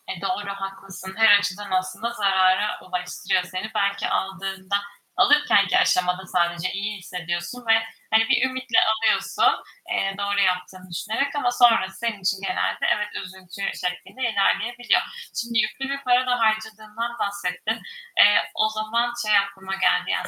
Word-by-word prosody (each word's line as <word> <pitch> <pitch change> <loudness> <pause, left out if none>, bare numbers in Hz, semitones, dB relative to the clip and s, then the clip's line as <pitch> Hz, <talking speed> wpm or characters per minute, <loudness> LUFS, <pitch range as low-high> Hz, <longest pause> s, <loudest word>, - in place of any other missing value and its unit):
E - - -6
doğru, 365 - -2
haklısın. 195 -1 -8
Her 220 -2 +7
açıdan 200 0 -4
aslında 185 +5 -1
zarara 195 -1 +2
ulaştırıyor 180 0 -2
seni. 185 +4 -6
Belki 200 0 0
aldığında, 190 0 -2 0.4
alırkenki 290 -10 +4
aşamada 180 +1 +2
sadece 175 0 0
iyi 205 +2 -3
hissediyorsun 175 +5 -5
ve 225 - +6 0.4
hani, 225 0 +4
bir - - +4
ümitle 255 -2 -2
alıyorsun, 220 0 +2 0.3
eee, 195 0 -1
doğru 200 0 -1
yaptığını 185 -1 -1
düşünerek. 225 - -2
Ama 250 -4 +1
sonrası 230 -6 +3
senin 230 -4 -3
için 190 +1 0
genelde, 195 - -1
evet, 210 0 -3 0.2
üzüntü 185 +1 -11 0.2
şeklinde 180 +8 -5
ilerleyebiliyor. 240 +4 +1 0.4
Şimdi 235 -1 -1
yüklü 270 +3 -1
bir 275 0 -4
para 250 0 +3
da 245 -1 +1
harcadığından 220 +1 -2
bahsettin. 200 +2 -2 0.4
Eee, 205 0 +7
o 215 - +2
zaman 220 +3 -1
şey 210 -1 +4
aklıma 195 -1 -2
geldi, 90 - +2
yani, - - -1
200 Hz, 140 wpm, -23 LUFS, 185-225 Hz, 0.4 s, Her